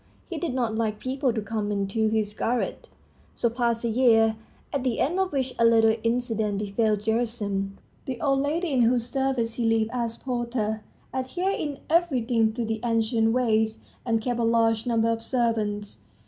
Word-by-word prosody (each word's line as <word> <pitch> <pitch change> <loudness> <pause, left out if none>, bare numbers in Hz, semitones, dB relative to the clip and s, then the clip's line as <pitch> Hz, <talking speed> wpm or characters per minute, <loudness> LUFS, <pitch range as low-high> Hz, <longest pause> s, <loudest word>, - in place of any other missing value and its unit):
He 335 - -3
did 325 -8 -2
not 235 -4 0
like 220 -2 -1
people 260 +2 -1
to 220 -2 -3
come 205 -2 -1
to 220 +3 0
his 215 -1 0
garret. 240 +3 -2 0.5
So 235 - +1
passed 235 -1 0
a - - +2
year, 225 -2 +4 0.4
at 280 -3 -1
the 250 -3 0
end 345 +7 +1
of 380 -1 +1
which 265 -3 -1
a - - +4
little 225 -1 +5
incident 225 -3 0
befell 210 +2 +1
Gerasim. 210 -3 -2 0.3
The 255 -3 -4
old 275 0 +2
lady, 310 +4 -1
in 260 -3 +3
whose 235 0 +3
service 260 -3 0
he 235 0 -2
lived 225 -1 +1
as 235 -2 -2
porter, 235 -4 -2 0.3
adhered 355 +10 -1
in 290 -3 -4
everything 250 -9 +2
to 235 0 -2
the 220 0 -2
ancient 225 -1 +2
ways, 220 -3 +1 0.2
and 225 -2 +1
kept 245 -1 -1
a - - +1
large 225 0 +2
number 230 -1 +2
of 225 0 -2
servants. 215 - -1
230 Hz, 175 wpm, -26 LUFS, 220-255 Hz, 0.5 s, little